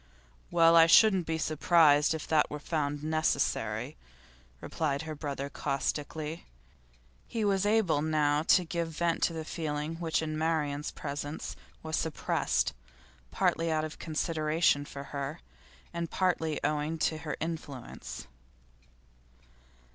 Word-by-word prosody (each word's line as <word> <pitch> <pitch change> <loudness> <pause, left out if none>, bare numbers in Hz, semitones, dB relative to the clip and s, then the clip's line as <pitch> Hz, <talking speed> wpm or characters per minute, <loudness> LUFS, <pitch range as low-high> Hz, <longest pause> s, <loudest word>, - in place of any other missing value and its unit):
'Well, 165 -1 +5
I 165 0 +8
shouldn't 190 -1 +6
be 160 0 0
surprised 155 -1 +4
if 155 - -6
that 155 -2 +3
were 150 - -4
found 145 -1 -2
necessary,' 155 0 0 0.6
replied 145 - -2
her 160 -1 -5
brother 140 -2 -4
caustically. 150 +3 -3 0.8
He 225 -2 -2
was 200 0 +2
able 205 -9 +3
now 150 -1 +2
to 175 +3 +4
give 170 0 -2
vent 165 +1 -1
to 170 - +2
the 160 -1 -5
feeling 155 0 -3
which 160 -2 0
in 155 -1 -3
Marian's 150 -2 0
presence 145 +1 -5 0.3
was 160 0 -2
suppressed, 160 -2 0 0.6
partly 165 - +1
out 155 0 +1
of 155 - -8
consideration 155 -2 +1
for 140 -1 -8
her, 140 +3 -4 0.5
and 170 -1 -3
partly 160 -4 0
owing 150 +2 0
to 155 0 0
her 155 -1 -4
influence. 155 -6 -6
155 Hz, 125 wpm, -30 LUFS, 150-165 Hz, 0.8 s, I